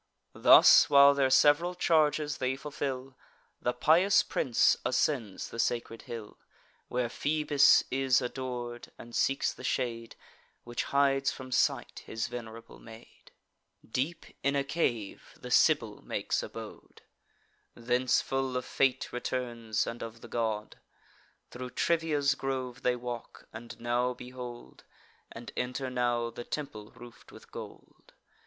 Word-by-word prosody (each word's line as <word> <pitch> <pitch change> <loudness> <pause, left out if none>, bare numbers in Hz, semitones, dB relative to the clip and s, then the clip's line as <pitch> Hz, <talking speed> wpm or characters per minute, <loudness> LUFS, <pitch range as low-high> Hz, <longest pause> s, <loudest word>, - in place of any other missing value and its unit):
Thus, - - +7
while 140 0 +7
their 140 -2 +2
sev'ral 145 +7 +4
charges 155 -3 +1
they 130 +1 0
fulfil, 135 -2 -5 0.5
The 125 - +1
pious 170 +10 +4
prince 120 -3 +2
ascends 120 -4 -1
the 115 - -8
sacred 115 -1 -1
hill 115 -3 -8 0.5
Where 125 -1 -1
Phoebus 150 +2 +3
is 130 -1 +3
ador'd; 125 -1 -5
and 120 0 -11
seeks 135 - +1
the - - -13
shade 115 -2 -2 0.5
Which 120 0 -4
hides 140 -1 +2
from 130 -1 -9
sight 125 - 0
his 110 +2 -3
venerable 115 -1 -9
maid. 115 0 -15 0.6
Deep 140 +9 -3 0.2
in 140 +1 +1
a 140 - +1
cave 120 -8 -3
the - - -9
Sibyl - - +3
makes - - -2
abode; - - -10 0.7
Thence 125 +2 +1
full 135 -1 -2
of 125 - -4
fate 130 -1 0
returns, 120 -3 -2
and 120 - -6
of 115 0 -8
the - - -10
god. 110 -3 -3 0.7
Thro' 125 0 -7
Trivia's 150 -1 +1
grove 130 -1 -4
they 125 0 +1
walk; 120 -1 -8
and 115 +1 -10
now 120 +1 0
behold, 125 -1 -10 0.5
And 120 +1 -9
enter 125 +1 -3
now, 120 -1 0
the 120 - -8
temple 110 -7 -6
roof'd 120 -1 -14
with - - -15
gold. - - -12
125 Hz, 130 wpm, -30 LUFS, 120-140 Hz, 0.7 s, Thus